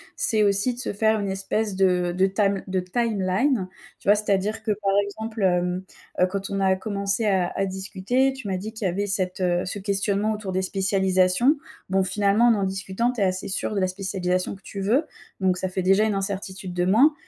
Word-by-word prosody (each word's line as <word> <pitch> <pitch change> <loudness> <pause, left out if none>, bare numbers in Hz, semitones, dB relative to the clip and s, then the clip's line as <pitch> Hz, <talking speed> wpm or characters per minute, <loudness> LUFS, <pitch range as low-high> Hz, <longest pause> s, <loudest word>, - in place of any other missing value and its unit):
c'est 215 -1 +3
aussi 205 +5 +2
de 245 - -8
se 250 - -2
faire 220 +1 +2
une 200 -1 -2
espèce 195 +2 -2
de 180 -2 +2
de 190 - +4
tam 195 0 +1
de 185 0 0
timeline, 200 +2 0 0.3
tu - - -14
vois? 205 - +7
C'est-à-dire 210 +1 -1
que 220 - 0
par 195 -1 +1
exemple, 220 +1 -5
hem, 180 0 +1 0.4
heu, - - +7
quand 195 +1 -4
on 195 0 -2
a 190 -1 +3
commencé 200 +2 -1
à 190 -4 +2
à 195 - 0
discuter, 195 +7 0
tu 265 -5 -8
m'as 190 - -1
dit 205 +4 -5
qu'il 220 -2 -5
y - - +1
avait 200 +4 -2
cette, 185 -1 -1
heu, 175 -1 +1
ce 195 - -4
questionnement 200 +1 0
autour 210 -3 -4
des 190 - +1
spécialisations. 190 +6 +2 0.3
Bon, 190 0 +2
finalement 205 +4 +3
en 235 - +6
en 200 - -1
discutant, 195 +5 -1
tu 245 - -7
es 200 - +3
assez 185 +1 -2
sûre 205 - -2
de 200 - +1
la 185 - +2
spécialisation 185 -1 -1
que 195 - -17
tu 200 - -8
veux, 230 +11 +2 0.4
donc 185 -1 +2
ça 185 - -1
fait 185 0 -3
déjà 195 +4 +4
une 215 - 0
incertitude 195 -1 -4
de 180 0 0
moins. 245 +11 +5
195 Hz, 220 wpm, -24 LUFS, 185-215 Hz, 0.4 s, vois